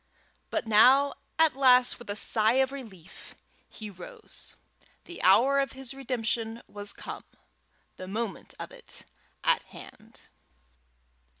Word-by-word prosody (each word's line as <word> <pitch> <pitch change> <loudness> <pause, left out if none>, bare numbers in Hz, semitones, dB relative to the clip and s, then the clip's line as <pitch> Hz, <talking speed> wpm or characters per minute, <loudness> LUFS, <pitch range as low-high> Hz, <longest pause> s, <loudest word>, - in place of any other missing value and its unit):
But - - -2
now 255 +6 +6 0.2
at 320 -4 +4
last, 255 -2 +5
with 240 - -12
a 205 - -1
sigh 215 +1 +2
of 265 0 +2
relief, 215 -11 -11 0.3
he 215 -2 -8
rose. 180 -2 -10 0.5
The 350 - -9
hour 250 +9 +5
of 275 -1 -1
his 265 -1 -7
redemption 235 -3 -3
was 205 0 -3
come, - - -8 0.7
the 185 - -8
moment 215 0 -5
of - - -7
it - - -8 0.4
at - - +3
hand. - - -14
235 Hz, 125 wpm, -28 LUFS, 210-270 Hz, 0.7 s, now